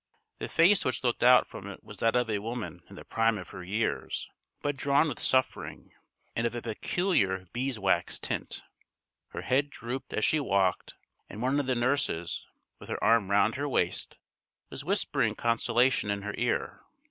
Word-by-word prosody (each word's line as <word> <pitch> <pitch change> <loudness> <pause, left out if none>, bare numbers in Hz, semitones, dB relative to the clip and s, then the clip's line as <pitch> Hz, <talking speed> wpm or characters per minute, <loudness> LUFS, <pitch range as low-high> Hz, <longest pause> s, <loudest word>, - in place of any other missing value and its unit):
The - - -4
face 185 +4 +5
which 130 - -1
looked 120 -2 0
out 125 0 +7
from 100 - -9
it 100 - -9
was 105 - -11
that 115 +5 +2
of 125 -1 +2
a 105 -2 0
woman 115 +2 -5
in - - -11
the - - -11
prime 115 -1 +2
of 90 - -8
her 90 - -8
years, 105 +5 -2 0.3
but 145 -1 0
drawn 140 +3 +3
with 140 - -4
suffering, 130 0 0 0.4
and 115 +1 +1
of 120 - -5
a 120 - -3
peculiar 110 - 0
beeswax 110 -9 0
tint. - - -3 0.6
Her - - -6
head 140 +3 +2
drooped 125 0 -6
as 110 - +1
she 155 - +3
walked, 100 -9 +1 0.3
and 105 - -8
one 130 +4 +1
of 140 - -2
the 130 - +2
nurses, 120 -9 0 0.3
with - - -12
her - - -3
arm 115 -4 +4
round 100 0 +4
her 145 +1 -2
waist, - - 0 0.5
was - - -6
whispering - - +1
consolation 120 0 +2
in 100 -1 -1
her 105 0 -4
ear. - - -1
120 Hz, 180 wpm, -29 LUFS, 105-130 Hz, 0.6 s, out